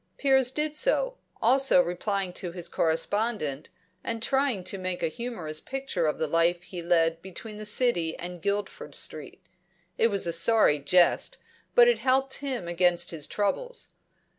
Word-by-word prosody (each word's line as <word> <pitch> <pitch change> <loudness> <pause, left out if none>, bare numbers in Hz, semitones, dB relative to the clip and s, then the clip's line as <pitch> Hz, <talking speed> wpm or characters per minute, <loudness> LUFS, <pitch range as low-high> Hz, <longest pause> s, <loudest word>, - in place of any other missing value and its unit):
Piers 265 -2 +3
did 300 +1 -2
so; - - +1 0.3
also 270 +4 +5
replying 195 -3 -1
to 180 -1 -5
his 175 -1 -6
correspondent, 165 - -1 0.3
and 230 -1 -3
trying 265 -6 0
to 190 +2 -4
make 185 -1 -4
a - - +2
humorous 170 -7 -5
picture 265 -11 -3
of 150 - -1
the 160 - -1
life 165 +3 +1
he 180 -1 -8
led 165 -1 +1
between 210 +3 -8
the 215 0 -3
City 210 -8 +1
and 175 0 -7
Guilford 200 -7 -3
Street. 155 +5 -4 0.6
It 230 - +5
was 200 -4 -1
a 170 - -1
sorry 170 -3 +4
jest, 175 +5 +3 0.4
but 485 -1 +7
it 485 - +3
helped 265 +1 +1
him 260 -10 -4
against 175 0 +2
his 155 -4 -3
troubles. 475 - -3
195 Hz, 160 wpm, -27 LUFS, 170-255 Hz, 0.6 s, but